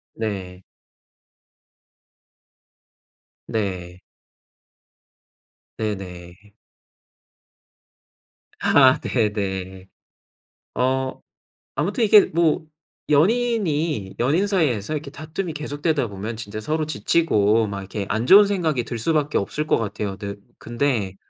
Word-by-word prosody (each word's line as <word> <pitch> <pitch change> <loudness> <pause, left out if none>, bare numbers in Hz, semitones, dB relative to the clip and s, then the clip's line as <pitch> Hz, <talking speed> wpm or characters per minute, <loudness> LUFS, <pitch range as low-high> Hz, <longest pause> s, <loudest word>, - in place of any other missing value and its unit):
네. 95 -4 -5 2.8
네. 90 -4 -3 1.8
네네. 95 -2 -6 2.1
아 130 - +5
네네. 95 -4 -2 0.9
어 130 +1 0 0.5
아무튼 195 - 0
이게 210 -1 +7
뭐 165 0 +1 0.4
연인이 165 - +1
연인 160 +12 +2
사이에서 155 - 0
이렇게 145 -2 -5
다툼이 160 +3 -5
계속되다 150 -2 -1
보면 105 +3 -6
진짜 110 -1 -6
서로 155 +7 -1
지치고 110 -5 +2
막 100 -1 -5
이렇게 100 +1 -5
안 110 +2 -1
좋은 200 +8 +8
생각이 165 -11 0
들 120 - -5
수밖에 150 +4 +1
없을 150 +10 -2
것 - - +3
같아요. 105 -2 -4
대 100 -1 -5 0.2
근데 115 -6 -1
120 Hz, 185 characters per minute, -22 LUFS, 100-155 Hz, 2.8 s, 좋은